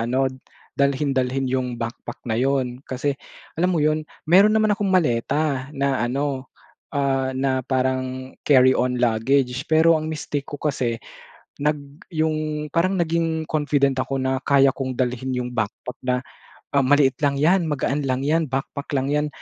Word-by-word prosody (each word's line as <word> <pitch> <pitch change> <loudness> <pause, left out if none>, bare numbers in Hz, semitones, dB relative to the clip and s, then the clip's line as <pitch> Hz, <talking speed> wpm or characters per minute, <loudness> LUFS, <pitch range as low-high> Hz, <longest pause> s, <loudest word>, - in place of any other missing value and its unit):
ano 125 +4 +1 0.5
dalhin-dalhin 135 -2 +1
'yong 130 -1 0
backpack 115 0 -6
na 115 -2 -1
'yon. 130 -2 0
Kasi, 130 +3 -1 0.5
alam 180 - +3
mo 160 - +1
'yon 155 0 +1 0.2
meron 195 +6 +5
naman 215 -1 +3
akong 205 -1 -1
maleta 145 -4 +1
na 140 -1 +1
ano, 135 +2 -2 0.5
ah, 135 -1 0
na 130 0 +1
parang 130 0 -1
carry-on 130 -2 +4
luggage 125 +3 +1
pero 160 +1 +5
ang 155 - -4
mistake 150 -2 -4
ko 145 - -5
kasi 130 -6 -1 0.7
nag 150 0 +2 0.3
'yong 155 -2 -1
parang 185 +3 +2
naging 165 -1 0
confident 145 -3 +1
ako 135 - -3
na 130 0 0
kaya 140 -1 +4
kong 130 -2 -4
dalhin 130 0 -1
'yong 125 0 -3
backpack 110 +2 -4
na, 125 -1 +1 0.6
"Ah, 140 -2 +3
maliit 140 -1 +4
lang 140 -1 +2
'yan, 175 +3 +4
magaan 145 -1 -1
lang 130 -1 0
'yan, 160 +4 +1
backpack 135 +2 -4
lang 135 0 0
'yan. 150 +1 +1
135 Hz, 150 wpm, -23 LUFS, 130-150 Hz, 0.7 s, meron